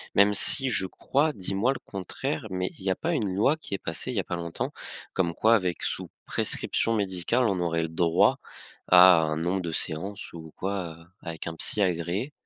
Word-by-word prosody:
même 100 +1 +5
si 135 +6 +4
je 95 -6 0
crois, 145 +10 0
dis-moi 100 +2 0
le 135 - -4
contraire 95 -2 -4
mais 90 0 -2
il - - -13
y 95 - 0
a - - +1
pas 170 - -2
une 105 - -1
loi 110 +11 +3
qui 155 - -10
est - - 0
passée 90 +9 -4
il 115 - -4
y - - +3
a 95 - -2
pas 90 - -3
longtemps, 85 -1 -4 0.4
comme 85 -3 0
quoi 110 +6 +4
avec 90 -4 -1
sous - - -3 0.2
prescription 115 - 0
médicale, 100 +4 0
on 95 -3 0
aurait 85 -1 0
le 80 - -2
droit 85 0 +3 0.5
à 90 -1 +8
un 75 -1 -1
nombre 90 +3 -1
de 85 - -4
séances 90 +6 -3
ou 80 -2 -10
quoi 95 -4 -3 0.2
avec 85 -1 -6
un 80 - -4
psy 105 - +1
agréé? 90 - -1
95 Hz, 205 wpm, -27 LUFS, 85-105 Hz, 0.5 s, à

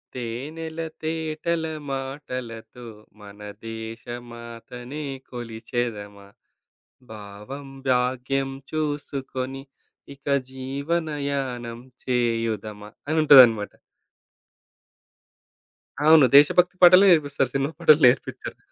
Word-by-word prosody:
తేనెల 150 +7 -6 0.2
తేటల 160 +1 -2 0.3
మాటలతో 125 -4 -6 0.4
మన 100 0 -13 0.3
దేశమాతనె 120 +4 -8 0.3
కొలిచెదమా, 115 -4 -5 0.9
భావం 105 +7 -9 0.2
భాగ్యం 130 +2 0 0.2
చూసుకొని 135 -3 -4 0.5
ఇక 140 0 -29 0.3
జీవనయానం 140 -3 -3 0.3
చేయుదమా 115 -4 -2 0.2
అనుంటదన్నమాట. 130 -9 +6 2.3
అవును. 155 -1 +7
దేశ 145 +1 +9
భక్తి 180 +1 +3
పాటలే 180 +2 +8
నేర్పిస్తారు 145 -5 +2
సినిమా 135 +3 0
పాటలు 155 -2 +5
నేర్పిచ్చరు. 125 - 0
130 Hz, 65 wpm, -24 LUFS, 115-145 Hz, 2.3 s, దేశ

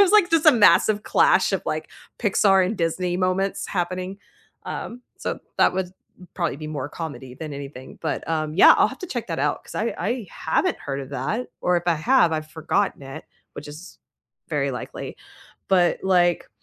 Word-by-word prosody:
it - - +10
was, 385 - +4
like, 415 -5 +5
just 330 -1 +3
a - - +11
massive 215 -2 +5
clash - - +3
of, - - 0
like, - - -3 0.3
Pixar 195 -3 +4
and 215 +4 -3
Disney 175 +1 -1
moments 185 +1 0
happening. 185 +1 -3 0.5
Um, 245 +1 -6 0.2
so - - -3 0.2
that - - +5
would 185 -1 -3 0.4
probably 170 -7 -1
be 155 - -7
more 145 -2 -4
comedy 145 -5 -7
than 155 +2 -7
anything, 140 -2 -9
but, 160 - -3
um, 155 -1 -1
yeah, 185 - +8
I'll - - +4
have - - -10
to 365 - -6
check 240 -7 -4
that 165 - -3
out 145 0 0
'cause - - -12
I 225 +2 -1
I 225 +4 -2
haven't 160 - 0
heard 135 -1 -4
of 135 -1 -9
that, 145 - -2
or 180 0 +2
if 175 - -2
I 170 - +3
have, 175 +2 +3
I've 155 -1 -2
forgotten 165 +5 -1
it, 135 0 -8 0.3
which 150 - -8
is 155 +6 -11 0.5
very - - 0
likely. - - -7 0.5
But, 180 -2 +3
like, 175 -3 +2
175 Hz, 190 wpm, -23 LUFS, 155-205 Hz, 0.5 s, a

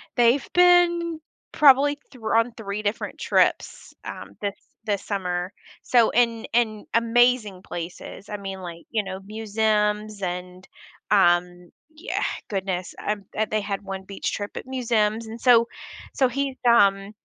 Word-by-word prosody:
they've 240 +3 +3
been, 345 -2 +4 0.3
probably, 285 0 +5
thr 225 -4 -3
on 230 +1 +2
3 210 -1 -5
different 205 +2 -3
trips, - - 0
um, - - -8
this 200 -1 -2 0.3
this 205 -2 -1
summer, 180 -2 -3 0.3
so 235 -3 +3
and 230 -2 +1
and 220 -3 +1
amazing 230 -4 +2
places, 175 +3 -8
I 210 - -4
mean, 195 -1 -7
like, 170 -1 -9
you 220 -2 0
know, 190 -1 -6
museums 210 0 -1
and, 180 0 -5 0.5
um, 175 -2 +2 0.2
yeah 335 +9 -3 0.3
Goodness, 190 -3 -3
um, 205 -1 -2
um, 215 0 +1
they 215 - +1
had 200 -1 -3
one 195 -1 -6
beach 195 0 -4
trip 205 -1 -5
at - - -6
museums 230 -4 0
and 225 +1 -9
so 235 -2 +5 0.5
so, 260 -2 +2
he's, 275 +1 -2
um 200 -3 +4
215 Hz, 145 wpm, -24 LUFS, 195-240 Hz, 0.5 s, probably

